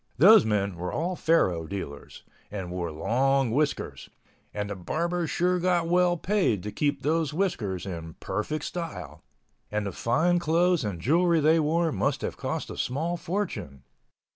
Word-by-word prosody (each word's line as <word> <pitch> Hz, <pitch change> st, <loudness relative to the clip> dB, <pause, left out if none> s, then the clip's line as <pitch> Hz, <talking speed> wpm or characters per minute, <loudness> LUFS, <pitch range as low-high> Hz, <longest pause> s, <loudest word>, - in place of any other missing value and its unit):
Those 205 Hz, -, +8 dB
men 100 Hz, -4 st, 0 dB
were 90 Hz, +1 st, -4 dB
all 180 Hz, +3 st, -2 dB
faro 90 Hz, -, +2 dB
dealers—and 95 Hz, +2 st, -8 dB
wore 90 Hz, -2 st, -3 dB
long 130 Hz, -, +1 dB
whiskers... 145 Hz, +4 st, -1 dB, 0.4 s
and 105 Hz, 0 st, -4 dB
the -, -, -3 dB
barbers 170 Hz, -, -2 dB
sure 180 Hz, +1 st, +1 dB
got 175 Hz, -1 st, +1 dB
well 175 Hz, 0 st, +3 dB
paid 180 Hz, -, +1 dB
to 105 Hz, -, -4 dB
keep 145 Hz, +3 st, -1 dB
those 155 Hz, -1 st, 0 dB
whiskers 110 Hz, -, -1 dB
in 80 Hz, -4 st, -6 dB
perfect 150 Hz, +8 st, -3 dB
style—and 105 Hz, -, -7 dB
the 100 Hz, -, -2 dB
fine 160 Hz, -, +1 dB
clothes 170 Hz, 0 st, +2 dB
and 100 Hz, -5 st, -3 dB
jewelry 170 Hz, -, +3 dB
they 155 Hz, +2 st, +4 dB
wore 160 Hz, +2 st, +1 dB
must -, -, 0 dB
have -, -, -3 dB
cost -, -, -4 dB
a -, -, -8 dB
small 160 Hz, +7 st, -1 dB
fortune. 125 Hz, -, -4 dB
145 Hz, 150 wpm, -27 LUFS, -, 0.4 s, Those